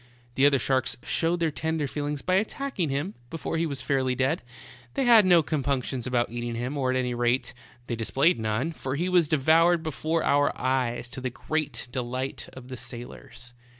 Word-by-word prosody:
The 135 +3 +5
other 140 -1 +4
sharks 130 -2 0
showed 170 +1 0
their 165 -2 +2
tender 160 0 -1
feelings 145 0 -3
by 185 - 0
attacking 215 - -2
him 145 +9 -2 0.2
before 165 +2 -3
he 165 0 +1
was 140 -3 -3
fairly 130 -2 +1
dead; 130 +6 +1 0.5
they - - +1
had 225 -5 +7
no 175 -3 +6
compunctions 135 -4 -1
about 120 -2 0
eating 120 0 -4
him, 125 +5 -3
or 135 -3 0
at 130 - +1
any 125 -1 -1
rate, 120 +1 0 0.3
displayed 120 +6 +1
none, 110 +8 -1
for 135 -4 -4
he 170 +5 -1
was 175 -3 +4
devoured 160 +4 +4
before 160 +1 -1
our 145 0 +2
eyes, 125 -2 0
to 130 - -7
the 130 - -1
great 155 +3 -3
delight 130 +1 -3
of 130 -1 -11
the 130 -1 -7
sailors. 120 0 -9
140 Hz, 185 wpm, -27 LUFS, 125-160 Hz, 0.5 s, had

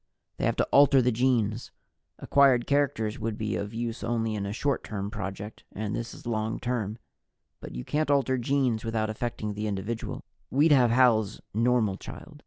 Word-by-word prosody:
They - - -1
have - - +1
to - - +1
alter 140 -1 +6
the 125 0 +3
genes 115 -2 +1 0.5
acquired 135 -4 +4
characters 125 -7 0
would 110 -1 -3
be 105 -2 -2
of 100 0 -3
use 115 +1 -4
only 115 -1 -1
in 100 -2 -3
a - - -3
short 140 +5 -1
term 100 -1 -4
project, 100 +1 -6
and 105 0 -3
this 115 - -4
is - - -12
long 110 -1 -2
term. 115 -4 -2 0.6
But - - -9
you 60 - -5
can't 155 0 0
alter 135 -2 +2
genes 125 -3 +1
without 110 -1 -1
affecting 110 -2 -3
the 105 +1 -3
individual. 105 +3 -4 0.3
We'd 150 +5 +3
have 125 -4 +6
Hal's 115 -4 +3
normal 115 -3 +2
child. 150 - -10
115 Hz, 180 wpm, -27 LUFS, 105-125 Hz, 0.6 s, alter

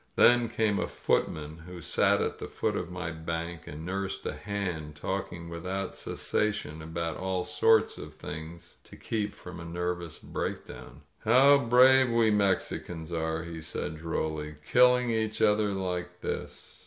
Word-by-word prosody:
Then 120 -1 +6
came 110 -3 +1
a - - 0
footman, 75 +1 -1
who 90 0 -8
sat - - +2
at - - -3
the - - -5
foot - - -1
of 90 - -3
my 90 -2 -4
bank 85 +1 -5
and 75 +2 -7
nursed 95 +1 -3
a - - -2
hand, 90 -7 -4
talking 85 +3 -4
without 90 +4 -4
cessation 80 -8 -2
about 80 0 -3
all 95 -1 -1
sorts 110 +4 +3
of - - -9
things 80 +3 -8
to - - -13
keep 105 -2 -3
from 90 -1 -9
a - - -7
nerv 90 +1 -2
ous 85 -3 -8
breakdown. 70 +4 -6 0.2
"How 135 +5 +7
brave 130 +1 +6
we 115 -2 +4
Mexicans 90 -4 0
are,*' 80 0 -1
he 85 -1 -7
said 80 0 -4
drolly, 80 -2 -3
Kill 125 0 +6
ing 125 -1 0
each 110 -1 -1
other 105 -1 +4
like 90 -2 -3
this - - -6
90 Hz, 160 wpm, -29 LUFS, 80-105 Hz, 0.2 s, How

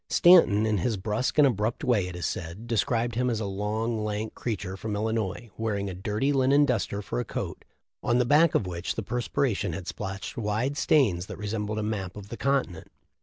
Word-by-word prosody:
Stanton, 165 - +6
in 110 -3 +1
his 110 +4 0
brusque 105 +8 -1
and 150 - +7
abrupt 115 +2 0
way, 115 -9 +2
it 90 - -7
is 90 - -4
said, 85 +6 -4
described 115 +1 0
him 125 +2 +1
as 115 -3 -1
a 110 - -2
'long, 105 +3 -2
lank 105 +1 -3
creature 100 -5 -4
from 105 +1 -4
Illinois, 110 0 -2
wearing 100 -3 -1
a - - -6
dirty 105 +9 -1
linen 140 +2 +4
duster 105 -5 -1
for - - -3
a - - 0
coat, - - -5 0.4
on 120 - +2
the 125 - +3
back 150 +5 +4
of - - +2
which 85 0 -4
the 110 - -3
perspiration 115 -4 -1
had 90 +1 -6
splotched 100 -1 -5
wide 115 +5 -1
stains 105 - +2
that - - -7
resembled 105 0 -3
a 110 - -1
map 105 -3 -3
of 100 -1 -9
the 115 - -6
continent. 135 -11 -1
110 Hz, 205 wpm, -27 LUFS, 100-120 Hz, 0.4 s, and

